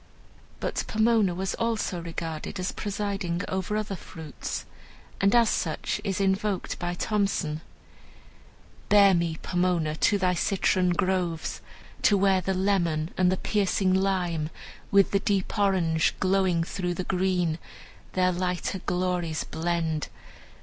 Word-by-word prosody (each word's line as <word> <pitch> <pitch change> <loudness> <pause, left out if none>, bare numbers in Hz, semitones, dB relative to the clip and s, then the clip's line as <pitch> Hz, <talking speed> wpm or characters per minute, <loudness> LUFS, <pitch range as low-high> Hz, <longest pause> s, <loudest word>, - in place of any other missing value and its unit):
But - - -2
Pomona 220 -4 +3
was 190 +1 -2
also 225 -6 -1
regarded 165 +2 -5
as 185 - -1
presiding 200 -3 -2
over 190 +2 -2
other 210 -2 -2
fruits, 160 -3 -7 0.6
and 195 +3 +4
as 235 -1 +6
such - - -2
is 195 -2 -1
invoked 195 0 0
by 175 0 -2
Thomson: 195 -7 -1 1.3
"Bear 200 -2 +7
me, 170 -2 0
Pomona, 175 -4 0
to 205 - +3
thy 185 -2 +2
citron 185 0 +1
groves, 175 -2 -1 0.4
To 205 - +4
where 190 -1 +3
the 190 +1 -1
lemon 175 -5 +1
and 185 -1 +3
the 190 - 0
piercing 195 -2 +1
lime, 180 -5 0 0.4
With 200 -1 +4
the 200 - +3
deep 195 -1 -1
orange, 175 -5 +2
glowing 185 -3 +2
through 180 0 -3
the 185 - -3
green, 180 -3 0 0.5
Their 185 0 +3
lighter 180 +1 -2
glories 180 -3 -1
blend. 160 -2 -2
185 Hz, 130 wpm, -27 LUFS, 170-195 Hz, 1.3 s, Bear